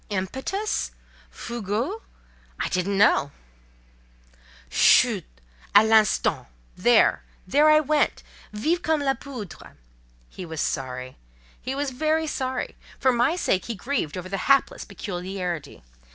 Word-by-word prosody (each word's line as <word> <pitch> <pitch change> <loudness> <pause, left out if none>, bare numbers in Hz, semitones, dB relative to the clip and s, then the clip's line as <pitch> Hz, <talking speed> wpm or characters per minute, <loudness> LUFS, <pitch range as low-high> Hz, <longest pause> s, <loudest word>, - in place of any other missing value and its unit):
Impetus? 265 - -2 0.4
Fougue? 235 - -4 0.6
I - - -1
didn't 190 +2 -1
know…." 195 -8 +4 1.4
"Chut! - - +4 0.5
à 210 +2 +8
l'instant! 220 - +3 0.3
There! - - +4 0.2
there 295 +10 +4
I 305 0 +6
went—vive 305 0 -1
comme 315 -3 +1
la 270 -1 +2
poudre!" 255 - -10 0.5
He 185 - -9
was 160 -3 -7
sorry—he 125 - -5
was 280 -1 -2
very 310 +4 0
sorry: 260 -4 -3 0.2
for 260 - +3
my 245 +7 +2
sake 190 - 0
he 230 - -4
grieved 210 - -3
over 180 0 -6
the 195 +1 -3
hapless 275 0 +3
peculiarity. 180 - -5
220 Hz, 110 wpm, -24 LUFS, 185-280 Hz, 1.4 s, à